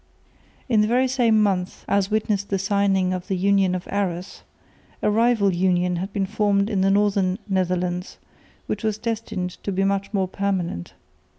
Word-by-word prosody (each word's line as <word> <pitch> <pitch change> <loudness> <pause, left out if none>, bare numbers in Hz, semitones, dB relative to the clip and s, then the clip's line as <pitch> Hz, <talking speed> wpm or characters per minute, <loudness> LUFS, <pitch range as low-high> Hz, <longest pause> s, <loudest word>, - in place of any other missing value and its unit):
In 225 -5 +3
the 210 - +2
very 250 +3 +2
same 240 -4 +3
month 190 -3 -1
as 200 -1 +1
witnessed 210 -2 -1
the 195 - +1
signing 195 -1 +1
of 180 -1 -5
the 190 -3 -1
Union 195 -1 +2
of 180 - -6
Arras, 190 -2 -3 0.6
a 210 - +3
rival 220 -3 +3
union 180 0 +1
had 190 +3 -4
been 195 -1 -1
formed 205 0 +1
in 195 -2 +1
the 195 - +3
northern 195 -2 +2
Netherlands, 180 -2 -1 0.5
which 210 - -4
was 215 -1 0
destined 220 -5 -3
to 200 - -2
be 190 +1 0
much 195 0 0
more 195 -3 0
permanent. 185 - -3
195 Hz, 170 wpm, -23 LUFS, 185-210 Hz, 0.6 s, In